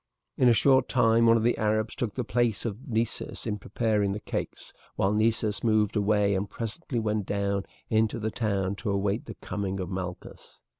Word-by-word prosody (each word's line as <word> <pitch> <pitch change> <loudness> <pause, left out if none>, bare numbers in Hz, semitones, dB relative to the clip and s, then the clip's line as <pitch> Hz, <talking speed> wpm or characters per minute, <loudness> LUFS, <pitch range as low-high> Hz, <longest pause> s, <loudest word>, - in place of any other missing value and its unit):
In 125 - +4
a - - +6
short 130 +3 +4
time 115 -2 +4
one 115 0 +6
of 110 - 0
the 120 - +2
Arabs 110 +1 +1
took 115 -4 -3
the 125 - -1
place 115 0 0
of 115 +6 -5
Nessus 115 -2 -2
in 105 -2 -2
preparing 105 -1 0
the 105 - -4
cakes, - - -5 0.2
while 95 +2 +1
Nessus 110 -1 +1
moved 110 -2 +2
away 105 -1 +2
and 100 +1 -1
presently 120 +4 -4
went 105 -3 -1
down 100 -1 -1 0.2
into 110 -1 +1
the 110 0 -2
town 100 -4 -1
to 105 - -3
await 100 +2 0
the 110 - -7
coming 95 0 -4
of 95 0 -4
Malchus. 95 -1 -7
110 Hz, 190 wpm, -27 LUFS, 100-115 Hz, 0.2 s, a